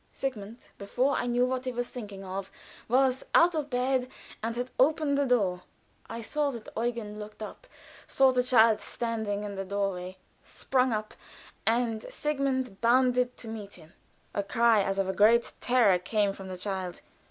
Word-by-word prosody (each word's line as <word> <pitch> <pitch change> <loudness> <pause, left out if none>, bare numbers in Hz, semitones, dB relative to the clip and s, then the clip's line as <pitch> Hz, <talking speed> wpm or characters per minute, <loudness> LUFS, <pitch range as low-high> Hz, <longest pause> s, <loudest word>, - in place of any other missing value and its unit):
Sigmund, 230 -4 -6
before 250 +7 0
I 245 - -1
knew 245 +1 +2
what 255 0 -2
he 255 - -1
was 245 0 -3
thinking 205 -5 -8
of, 190 +1 -5 0.4
was 260 +2 +2
out 345 +1 +6
of 300 -2 -2
bed 255 0 0 0.3
and 225 +1 -2
had 245 +1 -3
opened 295 +1 +3
the 280 -1 +1
door. 195 -8 +1 0.5
I 230 - -5
saw 295 +5 -1
that 235 -5 -7
Eugen 225 -2 -3
looked 210 +1 -8
up, - - -9 0.4
saw 270 -1 +4
the 250 -1 +2
child 230 -3 +4
standing 220 -3 -3
in 205 -1 -5
the 195 0 -4
door 200 0 -1
way, 180 +1 -7 0.2
sprung 255 -1 0
up, 215 -1 -3 0.5
and 230 -1 +1
Sigmund 270 -7 -1
bounded 250 +1 +3
to 230 - -10
meet 215 -3 -7
him. 160 -1 -17 0.4
A 200 - 0
cry 225 +1 +3
as 195 0 -1
of 195 -1 +1
a 190 - -1
great 230 +4 +4
terror 235 -7 +4
came 200 +2 0
from 195 -1 -9
the 185 -1 -6
child. 185 -2 -4
230 Hz, 175 wpm, -28 LUFS, 200-255 Hz, 0.5 s, out